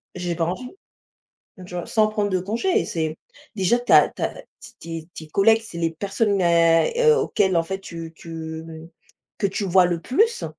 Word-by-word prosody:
j'ai 175 -1 -3
pas 165 -1 0
envie. 240 +9 -4 1.0
Tu 180 - -11
vois? 175 - -4
Sans 215 -1 +2
prendre 210 -1 -1
de 185 - +1
congés 230 - 0
et - - -2
c'est 160 -1 -3 0.4
déjà 195 +5 +2
tu 245 - -2
as - - +7
tu - - -9
as - - -1 0.5
tes 165 -1 -6
tes - - -28
tes 160 -1 -9
collègues, 220 +6 +4
c'est 170 -6 -9
les 165 -1 0
personnes, 200 +3 -1
à, 165 -1 +4
heu, 460 -1 +5
auxquelles, 190 - +1
en 165 - +3
fait, 190 +3 -4
tu 165 -3 -8
tu 160 -1 -7 0.7
que 200 - +1
tu 200 +1 -3
vois 185 -1 +4
le 175 -2 -2
plus. 435 - +1
180 Hz, 200 wpm, -23 LUFS, 165-215 Hz, 1.0 s, as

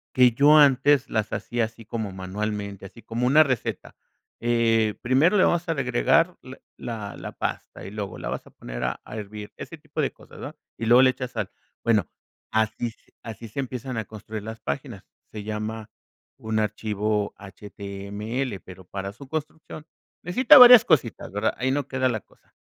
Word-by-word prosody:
Que 125 -1 +6
yo 145 +6 +6
antes 140 -1 +5
las 110 -1 -1
hacía 120 -1 -2
así 115 0 -12
como 110 -2 -4
manualmente, 100 +1 -5
así 115 +4 -12
como 115 +2 -2
una 150 +4 +7
receta. 130 -6 -3 0.5
Eh, 115 -2 +2
primero 140 +11 +3
le - - +5
vamos 175 0 0
a - - +3
agregar 160 +5 +2
la 130 +1 -11 0.2
la 110 -4 -6
la - - -7
pasta, - - -5
y 95 - -8
luego 105 -2 -5
la - - -6
vas - - -4
a - - -15
poner - - -7
a 65 0 -2
a - - -9
hervir. 105 0 -8
Ese - - -9
tipo - - -5
de - - 0
cosas, - - -16
¿no? - - -7 0.2
Y 115 - -4
luego 120 +3 +7
le 130 -1 +6
echas 125 -1 -6
sal. - - -3 0.3
Bueno, 105 -8 +2 0.4
así 110 +2 0 0.3
así 115 0 -8
se 110 +6 -4
empiezan 130 0 -5
a 110 - -1
construir 110 0 -8
las 110 +1 -7
páginas. 70 - -5 0.3
Se 105 -1 -7
llama 110 +1 -5 0.5
un 110 0 -2
archivo 105 -1 -1
HTML, 100 +4 -6
pero 95 0 -12
para 100 +2 -6
su 140 +6 -13
construcción 155 0 -6 0.4
necesita 230 +9 +6
varias 245 -2 +11
cositas, 130 - 0
¿verdad? 105 +2 0
Ahí 130 +2 0
no 140 0 -1
queda 130 -1 0
la 115 -3 -1
cosa. - - -29
115 Hz, 180 wpm, -25 LUFS, 105-130 Hz, 0.5 s, varias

